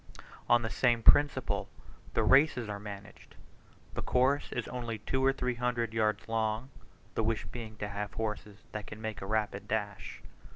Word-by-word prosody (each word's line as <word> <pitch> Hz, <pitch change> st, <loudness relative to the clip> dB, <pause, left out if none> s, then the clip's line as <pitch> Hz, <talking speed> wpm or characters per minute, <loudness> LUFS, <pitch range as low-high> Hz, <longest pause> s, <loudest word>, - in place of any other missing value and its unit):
On 120 Hz, 0 st, +5 dB
the 115 Hz, -, -1 dB
same 120 Hz, -2 st, +2 dB
principle 145 Hz, +4 st, +4 dB, 0.5 s
the -, -, +3 dB
races 135 Hz, -4 st, +5 dB
are 105 Hz, -1 st, -4 dB
managed; 100 Hz, 0 st, -10 dB, 0.6 s
the -, -, -3 dB
course 130 Hz, +3 st, +2 dB
is -, -, -2 dB
only 120 Hz, -3 st, -4 dB
two 130 Hz, +5 st, -1 dB
or 135 Hz, -, +6 dB
three 125 Hz, -2 st, -1 dB
hundred 120 Hz, -2 st, -1 dB
yards 110 Hz, -2 st, +1 dB
long, 115 Hz, +3 st, -1 dB, 0.4 s
the -, -, 0 dB
wish 110 Hz, 0 st, 0 dB
being 110 Hz, -3 st, -7 dB
to 105 Hz, -, -3 dB
have 105 Hz, 0 st, -4 dB
horses 105 Hz, -2 st, -4 dB
that 105 Hz, -1 st, -5 dB
can 105 Hz, -, -8 dB
make 110 Hz, -1 st, -4 dB
a 95 Hz, -, -5 dB
rapid 105 Hz, -2 st, -1 dB
dash. 100 Hz, -9 st, -3 dB
110 Hz, 170 wpm, -31 LUFS, 105-125 Hz, 0.6 s, or